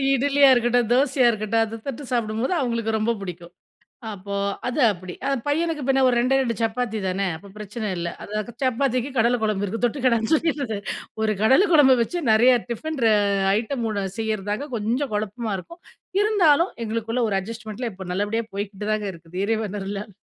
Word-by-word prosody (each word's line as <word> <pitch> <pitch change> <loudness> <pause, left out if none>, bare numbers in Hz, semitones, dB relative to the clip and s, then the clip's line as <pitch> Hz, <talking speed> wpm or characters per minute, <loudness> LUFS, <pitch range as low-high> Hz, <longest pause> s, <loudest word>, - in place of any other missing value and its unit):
இட்லியா 280 +1 +4
இருக்கட்டும், 240 -1 +2
தோசையா 260 -1 +3
இருக்கட்டும் 220 +1 0
அத 225 +1 -7
தொட்டு 275 +1 -5
சாப்பிடும்போது 235 +6 0
அவங்களுக்கு 230 -3 -1
ரொம்ப 220 +2 0
புடிக்கும். 175 -2 -8 0.6
அப்போ, 200 0 -6 0.3
அது 250 +4 -2
அப்டி. 185 -1 -8 0.3
பையனுக்கு 320 +1 0
பின்ன 270 0 +3
ஒரு 245 - +3
2டே 260 +3 +3
2 235 -4 -1
சப்பாத்தி 225 0 -1
தானே 195 +2 -1
அப்போ 200 +5 -12
பிரச்சனை 210 +1 -5
இல்ல. 170 0 -2
அது 210 +1 -4 0.2
சப்பாத்திக்கு 255 0 +1
கடல 235 +2 +3
குழம்பு 210 -2 0
இருக்குது 225 +5 -5
தொட்டுக்கடான்னு 235 -3 +1
சொல்லிடறது, 290 -8 0 0.5
ஒரு 215 -1 +2
கடலை 265 - +5
குழம்பு 275 -4 +7
வச்சு 290 +10 -2
நறையா 240 +4 +6 0.2
டிஃபன் 315 +5 -4
ர - - +6 0.5
ஐட்டம் 235 +1 -2 0.3
செய்றதாங்க 215 +3 -2
கொஞ்சம் 235 +5 -1
குழப்பமா 215 +1 -2
இருக்கும். 340 - -13 0.4
இருந்தாலும், 360 -5 +3
எங்களுக்குள்ள 225 +2 -1
ஒரு 195 - +1
அட்ஜஸ்ட்மென்ட்ல 225 +2 -6
இப்ப 185 -1 -9
நல்லபடியா 205 +4 -1
போய்க்கிட்டுதாங்க 210 +1 -2
இருக்குது 170 +2 -7
இறைவன் 215 -2 -1
அருளால. 200 +2 -5
225 Hz, 155 wpm, -23 LUFS, 210-260 Hz, 0.6 s, குழம்பு